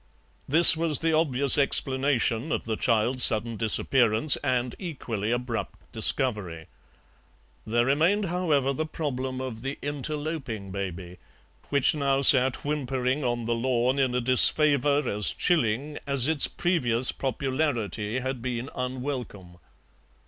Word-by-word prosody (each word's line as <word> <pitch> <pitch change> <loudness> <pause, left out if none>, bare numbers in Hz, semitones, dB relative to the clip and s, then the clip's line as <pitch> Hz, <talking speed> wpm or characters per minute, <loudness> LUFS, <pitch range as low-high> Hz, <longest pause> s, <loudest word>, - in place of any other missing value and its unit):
This 160 +3 +9
was 160 -3 0
the 165 0 -2
obvious 140 -4 +2
explanation 135 -1 0
of - - -4
the 110 -1 -4
child's 120 +3 +1
sudden 115 +1 +3
disappearance 115 +3 +2
and 125 -3 -3
equally 120 - -6
abrupt 120 -1 -6
discovery. 105 - -2 1.0
There 120 +2 0
remained, 165 +10 0
however, 160 -7 -2
the 155 +4 -5
problem 130 -5 -6
of 125 -4 -7
the 135 +2 -6
interloping 145 - -6
baby, 90 -2 -8 0.5
which 140 -2 +2
now 140 -2 -1
sat 130 -1 +7
whimpering 135 -1 -3
on 120 -2 -3
the 120 - -2
lawn 125 +2 -2
in 130 -2 -1
a 125 - -1
disfavour 145 +3 +4
as 105 0 0
chilling 145 -3 -2
as 140 -2 +1
its 160 -3 +3
previous 125 -9 -1
popularity 130 - -4
had 130 -1 -6
been 125 +1 -6
unwelcome. 125 -8 -7
130 Hz, 125 wpm, -24 LUFS, 115-145 Hz, 1.0 s, This